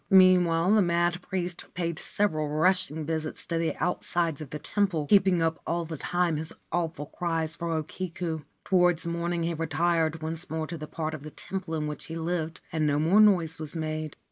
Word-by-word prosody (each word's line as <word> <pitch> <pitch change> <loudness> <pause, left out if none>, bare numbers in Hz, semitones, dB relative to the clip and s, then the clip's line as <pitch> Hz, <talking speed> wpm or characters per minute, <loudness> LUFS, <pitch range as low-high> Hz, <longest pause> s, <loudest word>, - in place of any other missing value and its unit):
Meanwhile 185 -2 +6
the 215 - +6
mad 175 0 +1
priest 180 -2 -3
paid 170 -2 -2
several 155 -7 0
rushing 160 0 +2
visits 160 0 -3
to 165 -1 -1
the 165 -1 0
outsides 170 -3 -1
of 150 - -7
the 150 - -4
temple, 180 -2 0
keeping 190 -1 +4
up 160 0 0
all 170 0 0
the 160 0 -5
time 175 +1 0
his 160 +1 -3 0.2
awful 165 -4 -1
cries 165 0 -2
for 170 0 -4
O 160 -1 0
Kiku. 165 0 -4 0.3
Towards 180 -3 +3
morning 170 0 -1
he 170 +1 0
retired 165 0 0
once 160 +2 -4
more 160 0 -2
to 170 +2 -6
the 155 - -6
part 160 0 -3
of 155 - -6
the 155 - -8
temple 185 +1 -4
in 155 -1 -1
which 150 0 -5
he 165 - -6
lived, 165 -1 -2
and 155 -1 +1
no 145 -1 +2
more 170 +8 +5
noise 170 -7 +4
was 155 +1 -6
made. 155 -1 -3
165 Hz, 195 wpm, -28 LUFS, 155-175 Hz, 0.3 s, Meanwhile